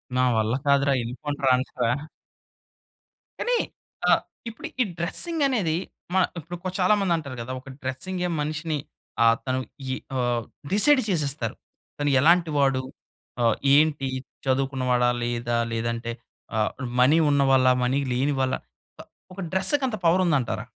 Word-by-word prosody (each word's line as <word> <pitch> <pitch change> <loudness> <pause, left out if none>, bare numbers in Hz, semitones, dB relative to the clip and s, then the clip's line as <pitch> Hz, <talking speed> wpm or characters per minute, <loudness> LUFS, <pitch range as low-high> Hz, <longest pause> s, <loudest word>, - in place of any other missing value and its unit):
నా 125 - +3
వల్ల 110 +1 +1
కాదురా! 140 0 +3
ఎళ్లిపోండి 145 +5 -5
రా! 130 - +5
అనేశావా? 125 -2 -1 1.5
కానీ, - - +1 0.5
ఆహ్, - - +5 0.3
ఇప్పుడు 225 - -8
ఈ - - +6
డ్రెసింగనేది, 245 - 0 0.4
మ - - 0 0.2
ఇప్పుడు 170 +2 -7
చాలా 170 - -23
కొ - - 0
చాలా 185 +3 +4
మంది 190 -3 +1
అంటరు 140 -5 -6
కదా! 115 +2 -6
ఒక 135 - -13
డ్రెసింగే 180 +8 -3
మనిషిని 155 +1 -2 0.5
ఆహ్, 115 0 +6
తను 130 0 0 0.3
ఈ - - 0 0.2
ఆహ్, 120 -2 0 0.3
డిసైడ్ 270 +6 +5
చేసేస్తరు. 140 - 0 0.4
తను 145 0 +1
ఎలాంటి 170 +1 +4
వాడు? 135 -2 +3 0.6
ఆహ్, 115 -2 +4 0.2
ఏంటి? 145 -3 +3 0.4
చదువుకున్నవాడా, 130 -2 +1
లేదా? 120 0 -1 0.2
లేదంటే 115 +1 -2 0.4
ఆహ్, 110 -1 +1 0.3
మనీ 145 +6 +5
ఉన్నవాళ్ళా, 135 -2 +4
మనీ 130 +3 +1
లేని 135 +4 +1
వాళ్ళా 130 0 +1 0.4
ప - - -6 0.3
ఒక 195 - -11
డ్రెస్సకంత 225 +7 +2
పవరుందంటారా? 165 -7 +2
140 Hz, 135 wpm, -25 LUFS, 125-170 Hz, 1.5 s, ఈ